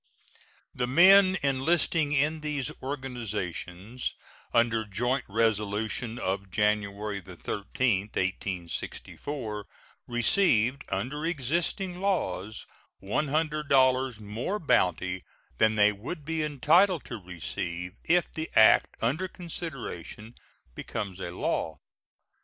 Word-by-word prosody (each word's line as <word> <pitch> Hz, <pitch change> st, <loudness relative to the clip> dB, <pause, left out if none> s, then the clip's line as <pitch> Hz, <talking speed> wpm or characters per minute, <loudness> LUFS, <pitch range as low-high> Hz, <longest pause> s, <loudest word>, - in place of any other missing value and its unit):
The 125 Hz, -, -1 dB
men 185 Hz, +7 st, +7 dB
enlisting 145 Hz, +3 st, +2 dB
in 150 Hz, +2 st, +2 dB
these 145 Hz, -4 st, -2 dB
organizations 115 Hz, -, -4 dB, 0.4 s
under 115 Hz, -1 st, +3 dB
joint 120 Hz, +6 st, -1 dB
resolution 110 Hz, +1 st, 0 dB
of 95 Hz, -1 st, -2 dB
January 105 Hz, 0 st, 0 dB
13, 100 Hz, +3 st, -1 dB
1864, 100 Hz, -, -4 dB, 0.4 s
receive 120 Hz, -, +3 dB
under 150 Hz, +5 st, -2 dB
existing 170 Hz, -, -1 dB
laws 110 Hz, -, -1 dB, 0.4 s
$100 135 Hz, -1 st, +2 dB
more 110 Hz, -, -3 dB
bounty 90 Hz, -, +1 dB, 0.4 s
than 110 Hz, 0 st, +4 dB
they 105 Hz, 0 st, +5 dB
would 135 Hz, -, -7 dB
be 160 Hz, 0 st, -1 dB
entitled 155 Hz, +5 st, +3 dB
to 115 Hz, -4 st, -7 dB
receive 85 Hz, +1 st, -5 dB
if 175 Hz, +1 st, +2 dB
the 160 Hz, 0 st, -4 dB
act 110 Hz, 0 st, +6 dB
under 155 Hz, +11 st, +1 dB
consideration 140 Hz, -, -7 dB, 0.4 s
becomes 95 Hz, +7 st, -5 dB
a 90 Hz, -, -4 dB
law. 80 Hz, -2 st, -2 dB
120 Hz, 95 wpm, -28 LUFS, 100-150 Hz, 0.4 s, men